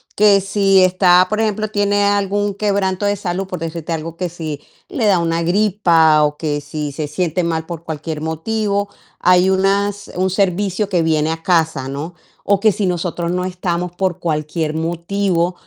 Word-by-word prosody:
Que 205 -1 +5
si 195 0 +3
está, 185 0 +4
por 215 +1 -1
ejemplo, 215 -1 0
tiene 205 -1 +1
algún 205 0 0
quebranto 200 -1 0
de 205 0 +1
salud, 190 0 -3
por 185 -2 -6
decirte 165 0 -4
algo, 165 +1 -5
que 180 -2 -2
si 155 -4 -6 0.3
le 275 - -1
da 195 -4 +4
una 165 0 0
gripa, 170 -5 +3
o 150 0 0
que 150 -2 -2
si 145 0 -5
se 150 +1 -4
siente 175 +2 -1
mal 160 -1 -2
por 170 -2 -7
cualquier 155 -1 -5
motivo, 200 +5 -2 0.3
hay 180 +1 +4
unas 200 +1 0
un 185 0 0
servicio 195 +1 0
que 175 -4 +1
viene 160 -1 +1
a 165 0 -5
casa, 160 -6 +1
¿no? 150 +6 -6 0.3
O 200 -1 +2
que 215 0 +4
si 195 -1 -1
nosotros 175 -1 -2
no 180 0 -1
estamos 180 -1 -3
por 185 -2 -1
cualquier 155 0 -2
motivo, 170 +2 -1
180 Hz, 175 wpm, -18 LUFS, 165-200 Hz, 0.3 s, Que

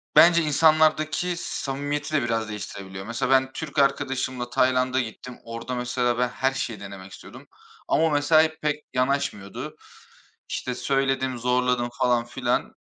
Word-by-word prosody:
Bence 170 0 +7
insanlardaki 155 +3 +3
samimiyeti 145 -1 -3
de 155 - +3
biraz 115 -2 -1
değiştirebiliyor. 100 -2 -7
Mesela 115 +3 -2
ben 130 0 +4
Türk 145 0 -4
arkadaşımla 130 -2 0
Tayland'a 130 0 +2
gittim. 125 +1 -6
Orada 115 +2 -5
mesela 125 0 0
ben 125 0 +2
her 130 +2 0
şeyi 115 -5 -4
denemek 100 -1 -9
istiyordum - - -12 0.4
ama 160 - +2
o 160 - +3
mesela, 145 +2 +5
hep 160 0 -3
pek 150 0 -1
yanaşmıyordu. 125 -7 -2 0.7
İşte 125 - -3
söyledim, 135 -1 0
zorladım 125 0 +1
falan 120 -1 +2
filan. 125 0 -2
130 Hz, 140 wpm, -25 LUFS, 120-145 Hz, 0.7 s, Bence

